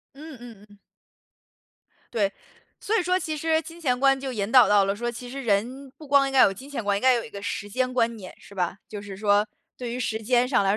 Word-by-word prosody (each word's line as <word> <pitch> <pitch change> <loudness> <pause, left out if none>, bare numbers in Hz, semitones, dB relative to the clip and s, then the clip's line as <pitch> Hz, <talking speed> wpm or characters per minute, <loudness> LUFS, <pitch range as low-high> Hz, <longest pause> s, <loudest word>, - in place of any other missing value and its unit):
嗯 300 0 -10
嗯 230 -4 -12
嗯。 205 0 -19 1.3
对， 205 -4 +1 0.5
所 435 - -1
以 450 - +3
说 365 +1 +1
其 315 -4 -3
实 320 +1 +1
金 335 +2 -12
钱 250 -5 0
观 270 0 +4
就 265 -1 -4
引 210 -3 -3
导 255 -4 +7
到 205 -1 +5
了， 195 +1 -1
说 240 +3 -3
其 245 +1 -8
实 270 +3 -6
人 240 +6 -1
不 305 - -12
光 280 0 +4
应 - - -4
该 265 -1 +5
要 - - +9
有 195 - +1
金 260 +9 -12
钱 275 -6 -4
观， 200 0 +1
应 200 - -2
该 260 0 +5
要 - - +2
有 - - -7
一 - - -11
个 200 -2 -8
时 205 0 -4
间 255 +4 -1
观 235 -2 +1
念， 190 -4 -10
是 - - -16
吧？ 180 -1 -2
就 205 -1 -7
是 200 -2 -9
说， 205 +1 +2 0.3
对 245 -2 -5
于 245 - -4
时 220 -2 -2
间 245 +2 +2
上 250 -6 +2
来 195 - +1
240 Hz, 285 characters per minute, -25 LUFS, 205-270 Hz, 1.3 s, 要